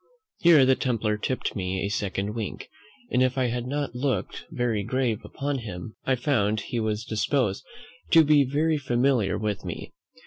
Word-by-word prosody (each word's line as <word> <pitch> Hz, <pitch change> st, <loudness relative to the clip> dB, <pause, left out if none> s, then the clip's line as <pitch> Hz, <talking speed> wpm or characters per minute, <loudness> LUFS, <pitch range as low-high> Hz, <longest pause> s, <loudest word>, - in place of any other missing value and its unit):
Here 165 Hz, -6 st, +7 dB
the 130 Hz, -, +5 dB
templar 115 Hz, -5 st, 0 dB
tipped 125 Hz, +5 st, -2 dB
me 95 Hz, -1 st, -2 dB
a -, -, -1 dB
second 100 Hz, -1 st, -2 dB
wink, 110 Hz, -3 st, -5 dB, 0.4 s
and, 125 Hz, -, +2 dB
if 130 Hz, +1 st, +2 dB
I 125 Hz, -2 st, +2 dB
had 120 Hz, +1 st, -3 dB
not 145 Hz, -1 st, -2 dB
looked 130 Hz, +2 st, -2 dB
very 120 Hz, -8 st, -1 dB
grave 120 Hz, 0 st, 0 dB
upon 140 Hz, 0 st, -3 dB
him, 105 Hz, -2 st, -7 dB
I 130 Hz, -, +2 dB
found 110 Hz, -5 st, +1 dB
he 120 Hz, +3 st, -3 dB
was 110 Hz, 0 st, -2 dB
disposed 110 Hz, -1 st, 0 dB, 0.5 s
to 165 Hz, -1 st, +7 dB
be 150 Hz, -1 st, +5 dB
very 150 Hz, +4 st, +1 dB
familiar 120 Hz, -6 st, +1 dB
with 105 Hz, -2 st, -2 dB
me. -, -, -6 dB
120 Hz, 170 wpm, -26 LUFS, 105-135 Hz, 0.5 s, Here